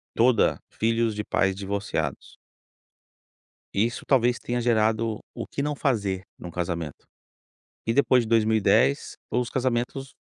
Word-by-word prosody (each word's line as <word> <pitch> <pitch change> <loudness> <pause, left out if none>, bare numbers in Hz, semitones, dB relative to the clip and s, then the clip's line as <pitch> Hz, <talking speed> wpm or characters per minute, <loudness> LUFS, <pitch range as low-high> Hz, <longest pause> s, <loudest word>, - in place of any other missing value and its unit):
toda 120 -1 +4
filhos 115 0 +1
de 105 - -2
pais 95 -2 +1
divorciados. 100 -7 -3 1.4
E 100 +3 +3
isso 120 - -4
talvez 125 -2 +3
tenha 120 0 -2
gerado 110 -1 +1 0.2
o - - -4
que - - -4
não 150 +1 -1
fazer 100 -10 0 0.2
em - - -10
um 85 - -6
casamento. 85 -3 -4 0.8
E 115 - +2
depois 130 -3 +4
de - - -7
2010, 110 -10 +3 0.2
os 125 -1 0
casamentos 130 +1 -1
115 Hz, 135 wpm, -26 LUFS, 100-120 Hz, 1.4 s, toda